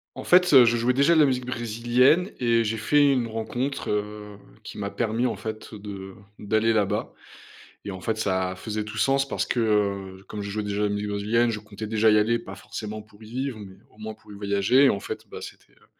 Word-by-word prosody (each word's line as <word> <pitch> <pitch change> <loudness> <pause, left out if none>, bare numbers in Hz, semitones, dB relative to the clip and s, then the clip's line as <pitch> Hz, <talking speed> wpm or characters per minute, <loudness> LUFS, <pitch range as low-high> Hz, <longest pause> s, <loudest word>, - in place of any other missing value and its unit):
En - - -7
fait, 180 -2 +5
heu, 130 -3 +9
je 115 - +3
jouais 120 +2 +2
déjà 140 +6 +4
de 160 - +5
la - - +7
musique 125 -2 0
brésilienne 120 - +2
et 115 -2 +2
j'ai 110 +1 -1
fait 145 +6 +3
une 125 -3 +1
rencontre, 120 +5 -3
heu, 105 0 -4 0.3
qui - - -9
m'a 100 -1 -3
permis, 115 +2 -1
en - - 0
fait, 110 0 -7
de 100 -2 -8 0.3
d'aller 110 +2 +1
là-bas 105 -3 0 0.7
et - - -4
en 95 - -8
fait, 110 +3 -2
ça 95 -3 -1
faisait 105 +2 -4
tout 105 +1 -8
sens, 135 +5 +2
parce - - -1
que, 120 - -1
heu, 100 -3 0
comme 105 -1 -6
je 100 - -5
jouais 105 +1 -3
déjà 100 0 -3
de - - +2
la - - 0
musique 105 0 -2
brésilienne, 110 +4 +1
je 105 - -4
comptais 105 0 -8
déjà 110 0 +3
y 105 - +5
aller. 115 +3 +2
Pas 115 - -9
forcément 110 0 -7
pour 105 0 -21
y 110 - -12
vivre, 130 -1 -3
mais 95 -2 -10 0.2
au - - -25
moins 110 0 -6
pour 105 -1 -17
y - - -9
voyager 100 +7 +3
et - - +6
en 100 - 0
fait, - - -7
bah, - - -8
c'était - - -12
heu - - -26
110 Hz, 240 wpm, -25 LUFS, 105-120 Hz, 0.7 s, heu